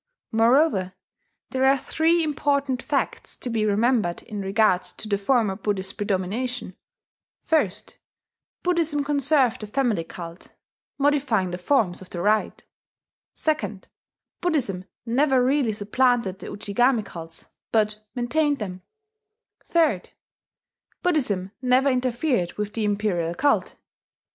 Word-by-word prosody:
Moreover, 225 - +3 0.6
there 260 -1 0
are 270 +1 +5
three 330 +4 +2
important 280 -3 0
facts 285 0 -2
to 245 - -5
be 220 -2 +1
remembered 210 -3 +1
in 210 -3 -6
regard 195 -1 +3
to 215 - -7
the 200 -1 0
former 215 -2 +2
Buddhist 195 -2 -2
predomination: 205 +3 -2 0.7
(1) 310 - +3 0.9
Buddhism 330 -5 +1
conserved 280 -4 +2
the 215 - -5
family 230 -6 0
cult, 170 +1 -10 0.4
modifying 275 -10 +2
the 180 - -4
forms 190 -4 +1
of 185 - -12
the 175 - -5
rite; 210 +4 +1 0.7
(2) 300 -11 -1 0.6
Buddhism 255 - 0 0.2
never 260 +2 +3
really 265 -3 +2
supplanted 210 -1 +1
the - - -8
Ujigami 220 +3 +1
cults, 165 -1 -8 0.2
but 215 -1 +1
maintained 290 +4 +1
them; 185 -5 -6 0.9
(3) 315 - +3 1.0
Buddhism 230 - 0
never 255 +2 +3
interfered 250 - 0
with 210 0 -4
the 220 -2 -1
imperial 200 -5 0
cult. 285 +9 +1
230 Hz, 115 wpm, -24 LUFS, 195-275 Hz, 1.0 s, are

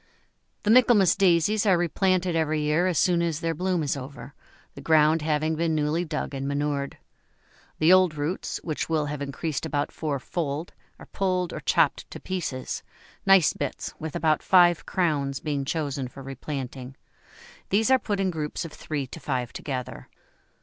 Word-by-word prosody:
The 210 - +3
Michaelmas 230 -6 +5
Daisies 195 +3 +3
are 185 -3 +5
replanted 180 +1 +1
every 155 -1 +1
year 150 +4 +2
as 180 -4 0
soon 175 +5 +3
as 165 -3 -1
their 165 -1 -1
bloom 180 0 -1
is 145 - -1
over, 135 -1 -9 0.4
the - - -10
ground 155 0 +4
having 155 +1 0
been 165 0 0
newly 155 +3 0
dug 155 -2 -4
and 135 0 -3
manured. 140 -1 -2 0.8
The 160 +4 +5
old 185 -4 +4
roots, 150 +5 -3
which 155 -1 -3
will 155 -2 +1
have 145 0 -5
increased 140 +1 -3
about 145 -2 -2
fourfold, 150 +1 -3 0.2
are - - -12
pulled 185 -2 -1
or - - -4
chopped - - +1
to - - -8
pieces, 160 -9 -4 0.5
nice 195 -4 +6
bits - - -4
with 155 -2 -6
about 155 -1 +2
five 175 -4 +4
crowns 145 -6 0
being 145 -3 -2
chosen 140 -3 -2
for 135 +2 -11
replanting; 135 -1 -6 0.7
these 220 +6 +2
are 260 - +6
put 205 -5 -2
in 190 -1 +1
groups 155 -1 -4
of 165 - -9
three 145 -3 -4
to 130 - -10
five 130 -5 -3
together. 130 -4 -6
155 Hz, 165 wpm, -26 LUFS, 145-175 Hz, 0.8 s, nice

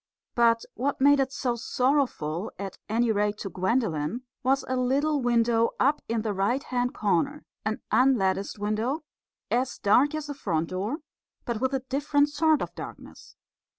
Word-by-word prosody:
But 230 -1 +3
what 275 +3 -2
made 285 +1 +5
it 265 -1 +1
so 250 -3 -1
sorrowful, 240 - 0
at 195 -1 -6
any 230 +1 +2
rate 210 0 0
to 195 -2 -6
Gwendolen, 190 - -1 0.2
was 270 +1 +1
a 260 - -1
little 275 +4 +1
window 235 -1 +2
up 290 +3 +3
in 225 -1 0
the 215 -2 -1
right 205 +8 0
hand 245 0 -1
corner 215 - 0 0.2
an 215 0 -2
unlatticed 200 -7 +2
window, 220 +9 -1 0.5
as 255 +2 0
dark 260 +9 +3
as 310 -1 -3
the 290 - -5
front 165 - -2
door, 205 - -3 0.4
but 235 -2 -3
with 260 +1 +1
a 265 - -1
different 285 +2 +2
sort 310 +1 +2
of - - -7
darkness. - - -10
245 Hz, 160 wpm, -27 LUFS, 210-275 Hz, 0.5 s, made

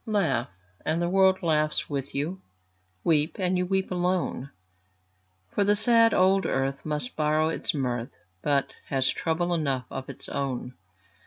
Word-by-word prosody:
Laugh, 195 - +1 0.3
and 160 +2 0
the 175 0 0
world 190 0 +4
laughs 155 -2 +1
with 140 -2 -4
you; 165 +7 -2 0.6
Weep, 155 -1 +2
and 185 -1 +1
you 180 - +1
weep 190 0 0
alone; 180 -6 -1 1.0
For 205 - +2
the 205 +1 +3
sad 230 +1 +5
old 190 0 +4
earth 135 +1 -1
must 155 +11 -3
borrow 155 +1 +2
its 160 - -2
mirth, 125 -4 -2 0.2
But 140 -2 +1
has 135 -1 +1
trouble 175 +2 -1
enough 140 -6 0
of 135 0 -6
its 135 - -9
own. 130 -3 -3
160 Hz, 150 wpm, -27 LUFS, 140-185 Hz, 1.0 s, sad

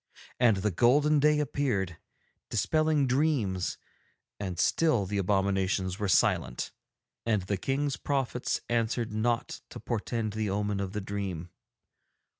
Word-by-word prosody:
And 115 -5 +5
the 100 +2 0
golden 145 - +4
day 150 +1 +4
appeared, 120 - -1 0.5
dispelling 155 -2 +2
dreams, 125 - 0 0.6
and 95 -3 -4
still 125 - +2
the 100 +1 -2
abominations 95 0 0
were 105 - 0
silent, - - +1 0.5
and 110 -4 +1
the 100 +2 -1
King's 135 +6 -1
prophets 135 -3 -1
answered 115 -1 0
not 115 +2 -1
to - - -8
portend 110 -1 -2
the 110 -1 -1
omen 105 0 -1
of 95 -1 -3
the 105 - -2
dream. 95 -4 -4
105 Hz, 125 wpm, -29 LUFS, 95-130 Hz, 0.6 s, And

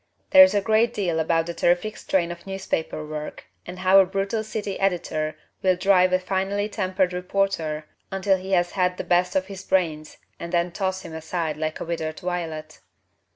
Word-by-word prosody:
There 285 -1 +11
is 280 -5 +4
a 205 - +3
great 220 +3 +2
deal 175 -6 0
about 165 +1 +1
the 170 - -4
terrific 175 +6 +1
strain 175 -3 0
of 170 +2 -10
newspaper 190 -5 -3
work 150 0 -7 0.2
and 180 +1 -7
how 185 +1 +5
a 190 - +6
brutal 195 +3 -1
city 210 -2 -4
editor 170 -5 -1 0.2
will 185 -1 +3
drive 185 0 +4
a 185 - +4
finely 195 +2 -1
tempered 185 -3 0
reporter 180 -4 -1 0.3
until 195 0 +2
he 190 +1 -5
has 175 -1 +2
had 180 -1 0
the - - -3
best 180 +1 +1
of 190 -1 +2
his 195 -1 -9
brains 160 -5 -1 0.2
and 170 - -6
then 175 0 +1
toss 190 +1 -2
him 165 - -9
aside 160 0 -3
like 155 +1 -3
a - - -4
withered 160 -2 -3
violet. 170 -4 -4
185 Hz, 190 wpm, -24 LUFS, 170-195 Hz, 0.3 s, There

